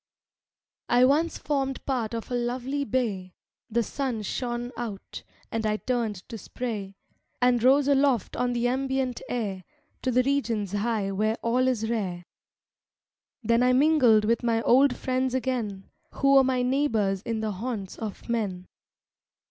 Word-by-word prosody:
"I 245 Hz, +1 st, +5 dB
once 305 Hz, +5 st, +2 dB
formed 270 Hz, -2 st, -2 dB
part 240 Hz, -4 st, -1 dB
of 230 Hz, +2 st, -6 dB
a -, -, -1 dB
lovely 250 Hz, +4 st, -1 dB
bay; 205 Hz, -8 st, -2 dB, 0.3 s
The 235 Hz, +1 st, +1 dB
sun 250 Hz, -2 st, -3 dB
shone 240 Hz, +3 st, -3 dB
out, 220 Hz, -5 st, -6 dB, 0.3 s
and 225 Hz, 0 st, -2 dB
I 215 Hz, -1 st, +1 dB
turned 225 Hz, -6 st, -2 dB
to 225 Hz, -, -7 dB
spray, 205 Hz, -4 st, -5 dB, 0.4 s
And 245 Hz, -1 st, +3 dB
rose 270 Hz, +3 st, +5 dB
aloft 275 Hz, -6 st, +2 dB
on 245 Hz, 0 st, 0 dB
the 240 Hz, 0 st, +1 dB
ambient 265 Hz, -1 st, -1 dB
air, 200 Hz, -6 st, -3 dB, 0.4 s
To 260 Hz, -, -1 dB
the 250 Hz, 0 st, +3 dB
regions 230 Hz, -8 st, 0 dB
high 205 Hz, -1 st, -1 dB
where 215 Hz, +3 st, 0 dB
all 250 Hz, +2 st, +2 dB
is 230 Hz, -4 st, 0 dB
rare; 190 Hz, -6 st, -3 dB, 1.2 s
Then 230 Hz, +2 st, +3 dB
I 250 Hz, 0 st, +4 dB
mingled 255 Hz, -6 st, +5 dB
with 230 Hz, +2 st, +2 dB
my 230 Hz, -1 st, +1 dB
old 265 Hz, +2 st, +5 dB
friends 255 Hz, 0 st, -1 dB
again, 235 Hz, -7 st, -3 dB, 0.2 s
Who 275 Hz, 0 st, +3 dB
were 270 Hz, -1 st, +7 dB
my 255 Hz, -1 st, +1 dB
neighbors 225 Hz, -8 st, +1 dB
in 225 Hz, 0 st, -3 dB
the 215 Hz, -1 st, -1 dB
haunts 205 Hz, -1 st, -5 dB
of 215 Hz, -3 st, -6 dB
men. 200 Hz, -6 st, -2 dB
240 Hz, 150 wpm, -26 LUFS, 215-260 Hz, 1.2 s, were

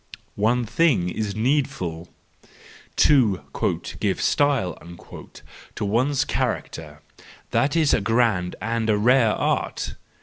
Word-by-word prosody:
One 120 Hz, +3 st, +2 dB
Thing 115 Hz, -, +2 dB
is 105 Hz, +1 st, -3 dB
Needful. 110 Hz, -, -1 dB, 0.9 s
—To 120 Hz, -11 st, +4 dB, 0.6 s
"give -, -, -1 dB
style" 135 Hz, -, +1 dB, 1.0 s
to -, -, -3 dB
one's 130 Hz, +6 st, +1 dB
character—that 75 Hz, -, -4 dB
is 155 Hz, -3 st, +3 dB
a -, -, +2 dB
grand 110 Hz, -5 st, +1 dB
and 115 Hz, 0 st, -2 dB
a 105 Hz, -, +3 dB
rare 115 Hz, +1 st, +4 dB
art! -, -, -2 dB
115 Hz, 100 wpm, -23 LUFS, 95-130 Hz, 1.0 s, To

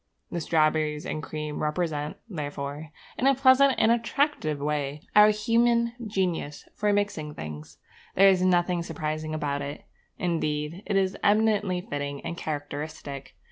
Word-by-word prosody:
The 170 Hz, -, -2 dB
strawberries 155 Hz, -1 st, +1 dB
and 155 Hz, -, -3 dB
cream 150 Hz, 0 st, -5 dB
represent, 150 Hz, -1 st, -2 dB
therefore, 145 Hz, -4 st, -5 dB, 0.3 s
in 260 Hz, -, +3 dB
a 275 Hz, -, +5 dB
pleasant 265 Hz, 0 st, +5 dB
and 220 Hz, -, +4 dB
attractive 235 Hz, -, 0 dB
way, 145 Hz, 0 st, -2 dB
our 210 Hz, 0 st, +8 dB
human 235 Hz, +2 st, +2 dB
genius 180 Hz, -7 st, -2 dB
for 210 Hz, 0 st, +1 dB
mixing 200 Hz, -7 st, -1 dB
things. 75 Hz, -1 st, -8 dB, 0.4 s
There 195 Hz, +1 st, +7 dB
is 190 Hz, -2 st, +4 dB
nothing 180 Hz, -1 st, +2 dB
surprising 155 Hz, -1 st, -3 dB
about 145 Hz, -2 st, -2 dB
it. 140 Hz, +1 st, -6 dB, 0.3 s
Indeed, 160 Hz, -1 st, -2 dB
it 205 Hz, -, 0 dB
is 190 Hz, 0 st, +2 dB
eminently 205 Hz, -3 st, +2 dB
fitting 145 Hz, -3 st, -4 dB
and 170 Hz, -, -5 dB
characteristic. 145 Hz, -2 st, -6 dB
160 Hz, 140 wpm, -27 LUFS, 150-205 Hz, 0.4 s, our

